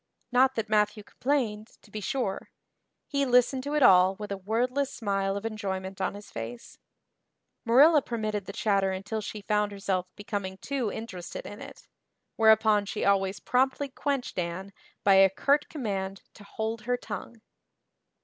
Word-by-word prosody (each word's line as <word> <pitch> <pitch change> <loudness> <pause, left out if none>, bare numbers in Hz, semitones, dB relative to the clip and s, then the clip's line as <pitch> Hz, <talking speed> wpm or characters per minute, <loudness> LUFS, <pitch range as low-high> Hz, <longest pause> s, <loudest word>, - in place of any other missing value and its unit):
Not 260 +1 +4
that 225 -2 -2
Matthew 210 0 +1
complained, 225 -5 -1 0.2
to 210 - -19
be 215 - -5
sure; 225 -3 -2 0.6
he 280 -1 0
listened 250 0 +3
to 290 +1 -2
it 300 - +3
all 185 -3 +6
with 210 0 -7
a 200 - -2
wordless 250 +8 -1
smile 195 -3 -1
of 200 - -6
enjoyment 195 -3 -4
on 190 - -1
his 205 0 -11
face; 115 +1 -8 0.9
Marilla 285 +7 +6
permitted 215 -5 -3
the - - -4
"chatter" 200 -2 +1
until 200 +4 -4
she 210 0 -7
found 210 0 +1
herself 195 -2 -2
becoming 200 -3 -4
too 250 0 -2
interested 190 -6 -7
in 205 - -9
it, - - -11 0.5
whereupon 220 -2 +4
she - - -2
always 195 -1 +2
promptly 265 +7 +1
quenched 275 -5 -2
Anne 180 +3 -4 0.3
by 200 - +5
a 195 0 +7
curt 280 +9 +1
command 195 -8 -4
to 205 - -14
hold 220 +2 -4
her 245 0 +1
tongue. 225 0 -7
210 Hz, 160 wpm, -28 LUFS, 195-245 Hz, 0.9 s, a